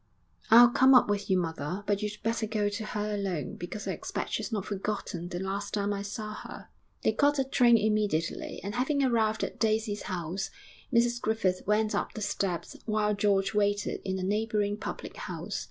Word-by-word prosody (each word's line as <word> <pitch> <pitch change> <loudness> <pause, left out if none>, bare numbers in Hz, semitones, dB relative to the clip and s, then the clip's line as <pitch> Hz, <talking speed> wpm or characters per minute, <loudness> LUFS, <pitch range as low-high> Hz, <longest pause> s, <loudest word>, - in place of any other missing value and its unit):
'I'll 240 +1 +9
come 260 +2 +6
up 250 - +7
with 205 0 -2
you, 190 - +4
mother, 170 +2 -3
but 205 0 0
you'd 210 0 -3
better 225 0 0
go 210 -1 0
to 205 +2 -4
her 210 0 -2
alone, 190 -8 -2
because 190 +4 -6
I - - 0
expect - - -4
she's - - -2
not 205 -4 -2
forgotten 195 -4 -3
the 175 - -4
last 200 +2 -3
time 205 0 0
I 200 - -3
saw 215 +1 -5
her.' - - -9 0.3
They - - +4
caught 290 0 +3
a 270 - +3
train 245 -3 +5
immediately, 210 -7 0
and 200 +2 -4
having 275 +4 +1
arrived 220 -4 +2
at - - -4
Daisy's 215 -1 +1
house, 185 +1 -3 0.4
Mrs 240 0 +2
Griffith 195 -4 0
went 210 +1 +2
up - - -1
the 215 - -5
steps 180 -4 -2
while 215 -1 +1
George 200 -1 +2
waited 205 -1 0
in 190 0 -2
a 185 - -3
neighbouring 210 +1 0
public 215 - -6
house. - - -4
210 Hz, 190 wpm, -29 LUFS, 195-220 Hz, 0.4 s, I'll